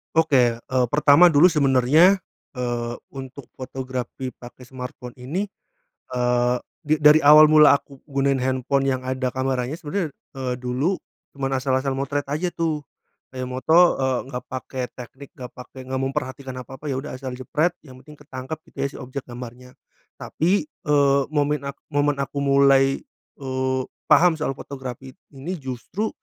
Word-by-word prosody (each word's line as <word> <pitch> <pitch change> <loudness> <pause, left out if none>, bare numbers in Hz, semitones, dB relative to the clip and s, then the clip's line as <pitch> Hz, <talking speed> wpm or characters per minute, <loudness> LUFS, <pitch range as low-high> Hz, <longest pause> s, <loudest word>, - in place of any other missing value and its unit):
Oke, 135 -7 +4
eee, 125 +2 -1
pertama 150 +5 +6
dulu 170 +2 +6
sebenarnya, 145 +6 +5 0.4
eee, 120 -1 -2 0.2
untuk 135 0 -9
fotografi 130 -1 -5
pake 120 +1 -13
smartphone 125 -1 -8
ini, 150 +11 -2 0.7
eee, 125 0 +1 0.3
di 155 0 +2
dari 150 +1 +7
awal 150 +1 +9
mula 150 -2 +8
aku 140 -2 -17
gunain 135 -1 +1
handphone 130 +1 0
yang 130 -1 0
ada 130 -1 -1
kameranya, 130 +1 -2
sebener, 165 0 -3 0.2
eee, 130 -2 -2
dulu 130 +9 -1 0.4
cuman 135 -1 -1
asal-asal 130 +1 0
motret 140 +1 -2
aja 155 +6 -1
tuh. 160 -3 -2 0.5
Kayak 130 -1 -5
moto, 160 +8 +4
eee, 130 -2 +1
nggak 125 -2 -6
pake 130 0 -5 0.2
teknik, 130 +3 -10
nggak 125 -1 -8
pake 125 +1 -12
nggak 130 0 -2
memperhatikan 130 0 -4
apa-apa, 135 +4 -8
ya 130 - -2
udah 135 -1 -7
asal 130 0 -6
jepret 150 +6 0
yang 130 -3 -13
penting 150 -1 -14
ketangkep 135 +1 -7
gitu - - -28
ya - - +1
si - - -14
objek 130 +2 -6
gambarnya. 125 +1 -10 0.5
Tapi, 185 - 0
eee, 140 - +2
momen 145 -1 0
a 140 - -3 0.2
momen 145 0 +2
aku 140 +1 -3
mulai, 135 -1 +4 0.4
eee, 130 -1 -1 0.3
paham 180 0 +6
soal 155 -3 -2
fotografi 130 -1 -8 0.2
ini 145 +7 -5
justru 135 - -4
135 Hz, 150 wpm, -23 LUFS, 130-145 Hz, 0.7 s, awal